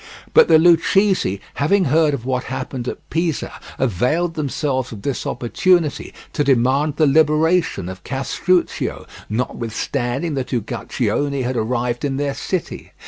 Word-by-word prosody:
But 475 - +7
the - - +7
Lucchese, 175 - +3 0.2
having 185 +6 +3
heard 155 0 +3
of 120 -3 -8
what 130 -1 -1
had 130 - -4
happened 130 -1 -5
at - - -6
Pisa, 165 -2 -1 0.3
availed 135 - 0
themselves 140 -4 -2
of 105 -3 -9
this 140 -3 -2
opportunity 165 +5 +1 0.2
to 145 - +1
demand 135 +3 +2
the 155 - +3
liberation 155 - +2
of 95 0 -8
Castruccio, 170 +7 -1 0.2
notwithstanding 120 +5 -2
that 135 -2 -3
Uguccione 140 +3 -1
had 125 +1 -2
arrived 120 +1 -1
in 135 -2 -1
their 140 -1 -1
city. 165 +5 -4
140 Hz, 140 wpm, -20 LUFS, 125-160 Hz, 0.3 s, But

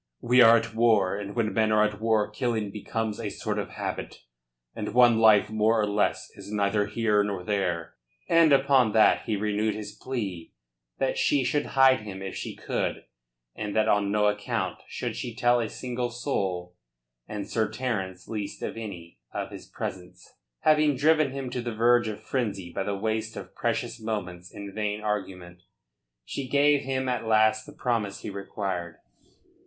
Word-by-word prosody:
"We 125 +1 +5
are 115 0 +8
at 115 0 -3
war, 110 -5 +3
and 100 0 -6
when 110 -3 0
men 110 -1 +2
are 105 0 +4
at 105 0 -4
war 110 -2 +2
killing 110 -2 -2
becomes 110 +1 -3
a 110 -3 -3
sort - - -3
of - - -4
habit, - - -5 0.5
and 105 +1 -5
one 120 -2 +6
life 110 -2 +5
more 110 +1 +2
or 105 - +3
less 105 0 0
is - - -10
neither 105 0 +1
here 105 -1 +2
nor 100 -3 -3
there." 90 -4 -1 0.3
And 165 -2 +5
upon 135 -5 +4
that 110 - +5
he 110 - +1
renewed 105 +1 0
his 105 -1 -6
plea 100 -10 -5 0.4
that - - 0
she 140 -2 +2
should 145 +4 0
hide 130 -1 +6
him 95 -2 -8
if 95 - -5
she - - -5
could - - -3 0.5
and 105 -1 -4
that 110 0 +3
on 105 -2 +2
no 105 0 +2
account 105 0 -1
should - - -4
she 120 -2 -5
tell 120 0 +3
a 115 -2 -2
single 125 0 -3
soul 95 -8 -3 0.5
and 105 -2 -5
Sir 110 0 0
Terence 95 -8 -3
least 105 -3 -5
of - - -4
any 90 -7 -8
of - - -4
his - - -10
presence. 90 -1 -7 0.3
Having 150 -2 +4
driven 155 +2 +3
him 135 -1 -5
to 125 - -2
the 120 -2 -4
verge 120 0 +4
of 105 -1 -6
frenzy 100 -9 -3
by - - -2
the 100 0 -2
waste 110 +1 -2
of - - -8
precious - - -2
moments 90 -5 -5
in 100 -1 -8
vain 105 0 -2
argument, 95 -4 -4 0.6
she 135 - -5
gave 145 +1 +4
him 130 0 -2
at 125 -2 -1
last 110 0 +3
the - - -9
promise 115 -5 -2
he - - -5
required. 95 -4 -4
110 Hz, 180 wpm, -27 LUFS, 100-120 Hz, 0.6 s, are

